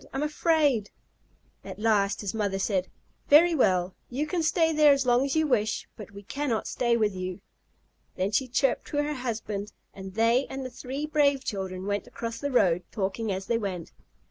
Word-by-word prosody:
I'm 270 +2 -1
afraid!" 300 - +2 0.7
At - - -8
last 205 -2 +1
his 200 -3 -3
mother 205 -3 -1
said: 190 -1 0 0.4
"Very 335 +4 +7
well. 185 - +2 0.2
You 280 +5 -2
shall 340 +2 -1
stay 325 0 +2
there 300 -1 +6
as 275 -1 +2
long 245 +1 +4
as 275 - -2
you 315 0 +3
wish, 215 -7 0
but 210 - -10
we 200 0 -11
cannot 265 0 -2
stay 235 -1 +1
with 210 -3 +1
you." 185 +1 -5 0.8
Then 190 +2 -1
she 255 +5 +1
chirped 255 +2 0
to 290 - -4
her 300 +1 -2
husband, 220 -5 -4 0.2
and 190 0 -9
they 230 +4 +3
and 265 0 -6
the 255 - -6
three 270 +5 -5
brave 285 -3 +2
children 190 -4 -4
went 205 0 -2
across 230 0 -6
the 285 - -2
road, 185 -9 +3
talking 205 +2 -2
as 190 0 -3
they 230 -1 0
went. 185 -6 -5
230 Hz, 190 wpm, -27 LUFS, 200-280 Hz, 0.8 s, Very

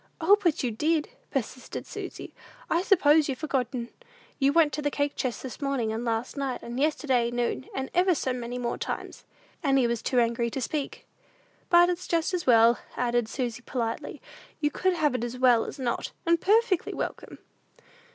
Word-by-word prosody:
"O, 360 +5 +6
but 340 -8 +1
you 245 - 0
did," 305 +7 0 0.2
persisted 255 -1 -4
Susy; - - -7 0.4
"I 335 - +3
suppose 315 -6 +4
you've 265 - -2
forgotten! 250 -5 -2 0.5
You 275 0 +4
went 315 -2 +4
to 300 - -2
the 290 - +1
cake 285 0 -1
chest 255 -3 -3
this 260 +3 -7
morning, 265 -6 -1
and 225 +2 -3
last 230 +1 -2
night, 275 -3 -3
and 240 +2 -5
yesterday 270 -5 +1
noon, 240 +2 -2
and 265 0 -3
ever 360 0 +3
so 260 -3 -1
many 245 0 -5
more 240 -1 -3
times." - - -5 0.4
Annie 270 -5 +3
was 235 -1 -1
too 250 - +1
angry 235 0 +1
to 265 - -4
speak. 280 +3 -4 0.6
"But 345 0 +7
it's 360 0 -3
just 335 +2 0
as 350 -5 -2
well," 230 -1 +6 0.2
added 240 -2 0
Susy, 240 -3 -3
politely; 230 -3 -4 0.4
"you 295 -1 +1
could 375 +4 +1
have 305 -4 +1
it 250 - -2
as 240 +1 -4
well 250 -3 +4
as - - -7
not, 250 -3 -2
and 335 0 +3
perfectly 420 -2 +2
welcome!" - - -5
265 Hz, 180 wpm, -27 LUFS, 240-310 Hz, 0.6 s, But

